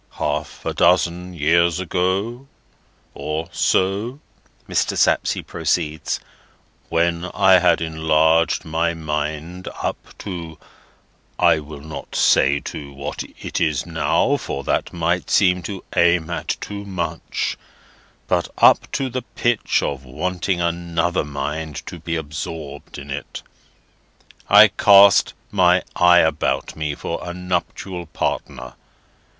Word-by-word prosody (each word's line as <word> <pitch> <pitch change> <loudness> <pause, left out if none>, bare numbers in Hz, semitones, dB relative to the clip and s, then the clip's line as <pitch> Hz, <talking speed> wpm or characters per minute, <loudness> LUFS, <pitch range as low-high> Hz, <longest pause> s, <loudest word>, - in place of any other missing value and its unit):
"Half - - -3
a - - -1
dozen 90 +1 +2
years 85 +2 +2
ago, 95 - -1 0.7
or 80 +2 -4
so," 100 +12 0 0.5
Mr. - - 0
Sapsea - - +2
proceeds, 75 +1 -2 0.7
"when 85 +1 +1
I 95 -1 +6
had 90 -2 +3
enlarged 80 0 +2
my 85 +1 0
mind 80 +3 -4
up - - -5
to—I 85 -3 -3
will 75 -1 -10
not 75 -1 -8
say 70 +2 +4
to 70 -2 -7
what 70 +1 -6
it 75 -3 -2
now 80 - +1
is, 145 - -1
for 70 - -4
that - - -1
might 85 +1 -1
seem 90 -2 +3
to 100 -2 -6
aim 85 -1 +3
at 85 - -2
too 100 0 -6
much, 85 -5 -3 0.7
but - - +1
up - - +5
to 135 - 0
the 130 0 -3
pitch 120 -1 0
of 70 -2 -3
wanting 90 +7 -2
another 85 0 0
mind 75 +2 -5
to - - -8
be 85 - -3
absorbed 75 -1 -6
in 70 0 -8 1.4
it—I - - +9
cast 100 -2 +6 0.2
my 90 -2 +4
eye 90 0 +6
about 80 -1 0
me 75 -2 -3
for 85 - -4
a 85 0 -6
nuptial 90 0 -3
partner. 65 -4 -4
85 Hz, 120 wpm, -21 LUFS, 80-90 Hz, 1.4 s, it—I